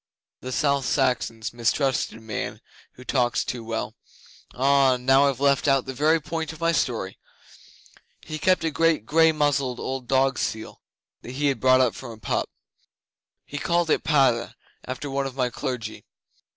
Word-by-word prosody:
The 130 Hz, -, -7 dB
South 140 Hz, 0 st, +1 dB
Saxons 115 Hz, -4 st, 0 dB
mistrust 120 Hz, +3 st, 0 dB
a 110 Hz, -, -11 dB
man 110 Hz, -2 st, -5 dB, 0.3 s
who 125 Hz, -, -13 dB
talks 125 Hz, -2 st, 0 dB
too 120 Hz, -2 st, -4 dB
well. 110 Hz, 0 st, -4 dB, 0.6 s
Ah! 135 Hz, 0 st, +3 dB
Now, 135 Hz, +3 st, +4 dB
I've 135 Hz, -2 st, -4 dB
left 140 Hz, 0 st, +2 dB
out 135 Hz, -2 st, +3 dB
the 130 Hz, -, -5 dB
very 155 Hz, +5 st, +3 dB
point 160 Hz, +1 st, -4 dB
of 160 Hz, -, -12 dB
my 165 Hz, 0 st, +2 dB
story. 115 Hz, -, -2 dB, 1.0 s
He 155 Hz, 0 st, -6 dB
kept 185 Hz, 0 st, +2 dB
a 160 Hz, -, 0 dB
great 165 Hz, -6 st, +1 dB
grey 160 Hz, +4 st, +4 dB
muzzled 140 Hz, -5 st, 0 dB
old 130 Hz, -2 st, -4 dB
dog 135 Hz, +1 st, +2 dB
seal 110 Hz, 0 st, -4 dB, 0.4 s
that 125 Hz, -, -9 dB
he 145 Hz, +2 st, +1 dB
had 135 Hz, -, -2 dB
brought 130 Hz, 0 st, +5 dB
up 125 Hz, -3 st, +2 dB
from 130 Hz, -, -9 dB
a -, -, -13 dB
pup. 100 Hz, -, -2 dB, 1.0 s
He 145 Hz, -, -6 dB
called 170 Hz, 0 st, +1 dB
it -, -, +2 dB
Padda 130 Hz, -6 st, +2 dB, 0.3 s
after 130 Hz, +3 st, -5 dB
one 135 Hz, 0 st, -2 dB
of 130 Hz, -, -9 dB
my 125 Hz, -2 st, 0 dB
clergy. 125 Hz, -5 st, -5 dB
135 Hz, 170 wpm, -24 LUFS, 125-145 Hz, 1.0 s, brought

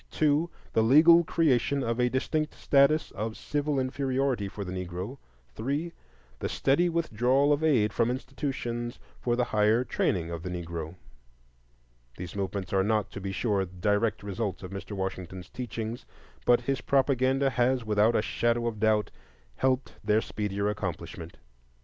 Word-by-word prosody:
2. 155 Hz, +2 st, +2 dB, 0.2 s
The 110 Hz, -, +4 dB
legal 160 Hz, +9 st, +7 dB
creation 140 Hz, -4 st, +2 dB
of 115 Hz, 0 st, -1 dB
a 125 Hz, 0 st, +3 dB
distinct 155 Hz, +4 st, -1 dB
status 140 Hz, +2 st, +3 dB
of 110 Hz, +2 st, -4 dB
civil 145 Hz, -1 st, -1 dB
inferiority 130 Hz, -3 st, 0 dB
for 100 Hz, 0 st, -6 dB
the 90 Hz, -, -5 dB
Negro. 90 Hz, +7 st, -5 dB, 0.3 s
3. 145 Hz, -, -2 dB, 0.5 s
The -, -, -2 dB
steady 160 Hz, +6 st, +2 dB
withdrawal 140 Hz, -3 st, +2 dB
of 145 Hz, +2 st, -1 dB
aid 115 Hz, -9 st, +3 dB
from 115 Hz, 0 st, +2 dB
institutions 125 Hz, -2 st, -3 dB, 0.2 s
for 120 Hz, -1 st, 0 dB
the 125 Hz, -, +2 dB
higher 110 Hz, 0 st, +2 dB
training 90 Hz, -7 st, -1 dB
of 85 Hz, -1 st, -5 dB
the 90 Hz, -, -5 dB
Negro. 85 Hz, -2 st, -5 dB, 1.2 s
These 90 Hz, 0 st, -7 dB
movements 100 Hz, 0 st, -3 dB
are 95 Hz, 0 st, +3 dB
not, 105 Hz, 0 st, 0 dB
to 100 Hz, -, -7 dB
be 95 Hz, 0 st, -3 dB
sure, 100 Hz, 0 st, 0 dB
direct 100 Hz, +4 st, 0 dB
results 100 Hz, 0 st, -3 dB
of 95 Hz, -, -7 dB
Mr. 100 Hz, +2 st, -6 dB
Washington's 95 Hz, -1 st, -5 dB
teachings; 115 Hz, -1 st, -5 dB, 0.4 s
but 120 Hz, 0 st, +5 dB
his 135 Hz, +1 st, -1 dB
propaganda 135 Hz, 0 st, +2 dB
has, 125 Hz, 0 st, +1 dB
without 110 Hz, +2 st, +3 dB
a 105 Hz, -, +2 dB
shadow 120 Hz, +1 st, 0 dB
of 115 Hz, -3 st, -2 dB
doubt, 110 Hz, -1 st, +2 dB, 0.5 s
helped 130 Hz, 0 st, 0 dB
their 105 Hz, 0 st, +3 dB
speedier 100 Hz, -2 st, -2 dB
accomplishment. 85 Hz, -4 st, -5 dB
115 Hz, 150 wpm, -28 LUFS, 100-135 Hz, 1.2 s, legal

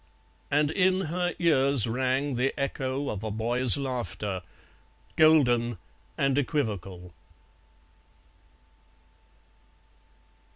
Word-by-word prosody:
And 150 Hz, +1 st, +1 dB
in 185 Hz, +1 st, +1 dB
her 180 Hz, 0 st, -2 dB
ears 140 Hz, -6 st, +4 dB
rang 130 Hz, +4 st, -1 dB
the 125 Hz, +2 st, -2 dB
echo 140 Hz, 0 st, -3 dB
of 105 Hz, 0 st, -6 dB
a 110 Hz, -, -3 dB
boy's 120 Hz, +4 st, +2 dB
laughter, 120 Hz, -8 st, -4 dB, 0.7 s
golden 125 Hz, -8 st, +3 dB, 0.4 s
and 135 Hz, 0 st, +1 dB
equivocal. 100 Hz, -, -4 dB
130 Hz, 80 wpm, -26 LUFS, 115-145 Hz, 0.7 s, ears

